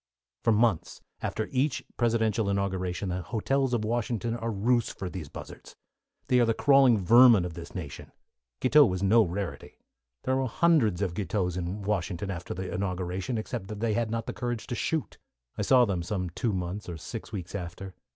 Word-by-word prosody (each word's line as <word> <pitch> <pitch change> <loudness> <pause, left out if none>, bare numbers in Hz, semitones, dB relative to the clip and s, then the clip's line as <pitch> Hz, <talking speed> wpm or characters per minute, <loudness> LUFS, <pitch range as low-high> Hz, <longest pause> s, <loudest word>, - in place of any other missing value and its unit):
For 115 - +4
months 110 -5 +1 0.2
after 110 - -2
each 135 +1 0
presidential 110 -3 +1
inauguration 95 -1 -1
the 90 +1 -2
hotels 130 +7 0
of 115 -3 0
Washington 115 0 -1
are 115 0 -3
roosts 115 +3 +1
for 90 -2 -6
these 85 -7 -7
buzzards. - - -10 0.5
They 125 - +3
are 120 - +5
the 115 -1 +1
crawling 135 -5 +5
vermin 115 0 +6
of 90 - -5
this 85 +3 -10
nation. 80 -7 -7 0.5
Guiteau 145 +3 +6
was 95 -6 0
no 110 +4 +5
rarity. 95 -1 -4 0.5
There 130 0 +1
were 135 -1 0
hundreds 115 - +2
of 90 -4 -1
Guiteaus 90 -2 -1
in 90 +3 -4
Washington 95 -1 -2
after 85 -1 -5
the 95 -1 -5
inauguration, 90 +3 -2
except 110 -3 -4
that 105 0 -6
they 115 -1 0
had 115 0 0
not 115 0 -2
the - - -4
courage 120 -3 -3
to 120 - -4
shoot. 160 +4 -2 0.4
I - - -3
saw 125 -2 +5
them 95 -5 -1
some 90 0 -3
two 115 +6 -1
months 95 +1 -4
or 85 - -5
six - - -7
weeks 90 -3 -6
after. 95 0 -6
105 Hz, 185 wpm, -28 LUFS, 90-120 Hz, 0.5 s, vermin